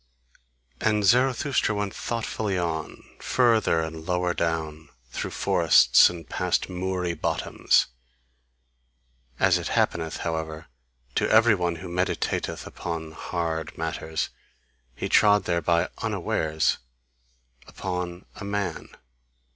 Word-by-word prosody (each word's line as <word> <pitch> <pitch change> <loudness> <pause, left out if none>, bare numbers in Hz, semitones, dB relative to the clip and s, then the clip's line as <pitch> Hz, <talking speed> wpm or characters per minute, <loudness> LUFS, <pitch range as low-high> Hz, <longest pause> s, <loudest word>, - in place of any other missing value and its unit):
And 105 -2 +1
Zarathustra 125 +1 +2
went 100 -1 -2
thoughtfully 110 -4 -2
on, 80 -3 -3 0.2
further 115 -9 +3
and 80 0 -5
lower 90 0 0
down, 80 -2 -2 0.2
through - - -3
forests - - +5
and 85 -3 -8
past 90 +1 -1
moory 90 -1 -2
bottoms; 80 - +1 1.5
as - - +4
it - - -4
happeneth, 80 -2 0
however, 80 -1 -3 0.5
to - - +1
every 110 +1 +6
one 90 -3 0
who 90 +3 -8
meditateth 90 +1 -2
upon 80 -2 -5
hard 80 -1 -4
matters, 80 -1 -3 0.6
he - - -3
trod 105 -1 +5
thereby 85 -1 +1
unawares 80 0 0 0.9
upon 90 -1 -5
a - - -7
man. 100 -1 -3
90 Hz, 105 wpm, -26 LUFS, 80-100 Hz, 1.5 s, every